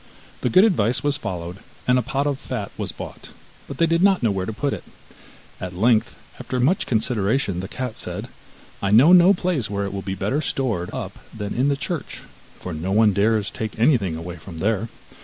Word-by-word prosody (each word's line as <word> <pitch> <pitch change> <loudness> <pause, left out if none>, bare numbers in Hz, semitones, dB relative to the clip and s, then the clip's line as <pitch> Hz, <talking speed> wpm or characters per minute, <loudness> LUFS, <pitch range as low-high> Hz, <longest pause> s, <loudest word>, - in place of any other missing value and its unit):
The - - +1
good 185 +1 +6
advice 125 - +2
was 145 0 +2
followed, 90 - -5 0.3
and 125 0 +4
a - - +1
pot 135 +4 -1
of 140 -2 -1
fat - - -5
was - - -3
bought, - - -9 0.4
but - - -7
they 165 - +4
did 165 +1 +2
not 195 -6 +4
know 115 - +3
where 95 -1 -2
to - - -2
put 140 +6 -1
it. - - -6 0.8
At 90 -1 -6
length, 110 +3 +2 0.2
after 125 - -3
much 150 +10 +2
consideration, 110 -3 0
the 95 - -4
cat 125 +1 -5
said: - - -4 0.5
'I 100 - 0
know 150 +9 +7
no 180 +2 +7
place 175 - -1
where 100 0 -2
it 100 - -5
will 100 - -3
be 95 0 -4
better 135 +10 -1
stored 115 - -1
up - - -6
than 105 -2 -5
in 130 +3 +1
the 140 -1 +1
church, 155 +2 -5 0.4
for 90 - -6
no 80 +5 -3
one 105 0 +4
dares 105 +1 +2
take 110 -1 -5
anything 110 - +3
away 85 +2 -6
from 85 +1 -10
there. 110 +5 0
110 Hz, 210 wpm, -23 LUFS, 95-140 Hz, 0.8 s, know